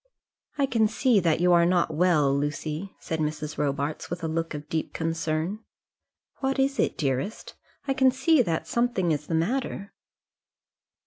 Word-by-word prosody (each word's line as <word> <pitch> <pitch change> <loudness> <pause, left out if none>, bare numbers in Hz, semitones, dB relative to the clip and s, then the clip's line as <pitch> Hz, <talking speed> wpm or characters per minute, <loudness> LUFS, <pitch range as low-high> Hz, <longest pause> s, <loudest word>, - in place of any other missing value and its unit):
"I 280 - +3
can 230 -5 +2
see 240 0 +3
that 165 -4 +1
you 180 0 +5
are 170 0 +6
not 175 -2 +2
well, 155 -4 +3
Lucy," 150 +5 -3
said 160 - -4
Mrs. 150 0 -3
Robarts, 145 +1 -2
with 175 0 -5
a - - 0
look 165 0 -2
of 150 0 -7
deep 160 -1 -3
concern. 165 +3 -2 0.8
"What 270 0 -1
is 270 +1 +1
it, - - +1
dearest? 140 - -2 0.3
I 270 - +2
can 265 0 +4
see 270 +3 +3
that 165 -8 -1
something 235 -8 +1
is 150 -1 -2
the 165 - -1
matter." 200 +3 -2
165 Hz, 165 wpm, -26 LUFS, 155-220 Hz, 0.8 s, are